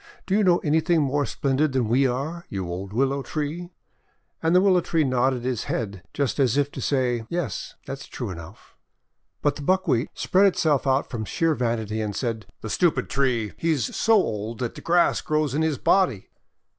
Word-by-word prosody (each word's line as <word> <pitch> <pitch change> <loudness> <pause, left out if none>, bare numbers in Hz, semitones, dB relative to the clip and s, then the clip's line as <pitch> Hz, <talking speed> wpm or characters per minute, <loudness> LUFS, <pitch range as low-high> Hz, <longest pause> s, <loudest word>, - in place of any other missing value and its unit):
Do 190 - 0
you 215 - +3
know 180 -2 +5
anything 160 +2 +2
more 145 0 +1
splendid 140 +1 0
than 130 -4 +1
we 130 +4 +3
are, 150 +8 -4
you 95 -3 -4
old 95 +3 -5
Willow 135 +5 +1
Tree?" 155 +5 -4 0.7
And 165 +2 +2
the - - +8
Willow 185 -2 +4
Tree 165 -2 +1
nodded 130 -1 +1
his 125 -3 -2
head, 100 -5 -3
just 140 -1 -1
as 130 -1 +3
if 145 0 +1
to - - -7
say, 125 -4 0
'! - - -43
Yes, 170 -8 -3
that's 135 0 -7
true 120 -6 -5
enough!' 85 +3 -11 0.7
But 145 -1 +1
the - - -8
Buckwheat 150 -6 +1
spread 195 +2 +3
itself 155 -7 +1
out 135 +1 +2
from 115 -4 -3
sheer 165 +9 +1
vanity, 110 -4 -1
and 105 -2 -3
said: 115 -4 -3
"The 110 - -6
stupid 175 -3 +1
tree! 125 -6 0
He's 160 -5 0
so 225 - +3
old 110 - 0
that 120 -2 -3
the - - -10
grass 175 +1 +3
grows 155 -3 0
in 150 - 0
his 160 -3 +1
body!' 135 - +1
135 Hz, 195 wpm, -24 LUFS, 115-160 Hz, 0.7 s, the